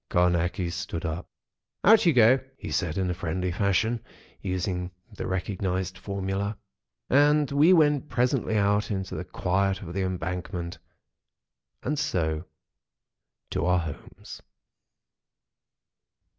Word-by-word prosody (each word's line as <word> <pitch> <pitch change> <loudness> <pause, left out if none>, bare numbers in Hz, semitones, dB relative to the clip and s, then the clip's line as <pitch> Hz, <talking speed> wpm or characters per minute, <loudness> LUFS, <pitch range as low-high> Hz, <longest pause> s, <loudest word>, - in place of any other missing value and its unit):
Carnacki 90 0 +1
stood 90 -2 -4
up: 80 +2 -4 0.6
"Out 210 -1 +6
you 165 - +6
go!" 125 +1 +6 0.2
he - - -7
said 85 -2 -1
in 90 -2 0
friendly 90 +2 -2
fashion, 110 +5 +1 0.4
using 90 -1 -2 0.3
the - - -4
recognised 95 0 -2
formula. 100 +2 -3 0.5
And 145 +1 +4
we 145 +5 +5
went 150 -4 +4
presently 125 -3 +1
out 105 +1 +2
into 95 -2 -3
the - - -3
quiet 95 +2 0
of 85 -2 -7
the 95 - -1
Embankment, 90 -1 -3 1.0
and 150 +2 -1
so 80 - -1 1.1
to - - -1
our 90 0 +4
homes. 80 -5 -7
95 Hz, 115 wpm, -27 LUFS, 90-110 Hz, 1.1 s, Out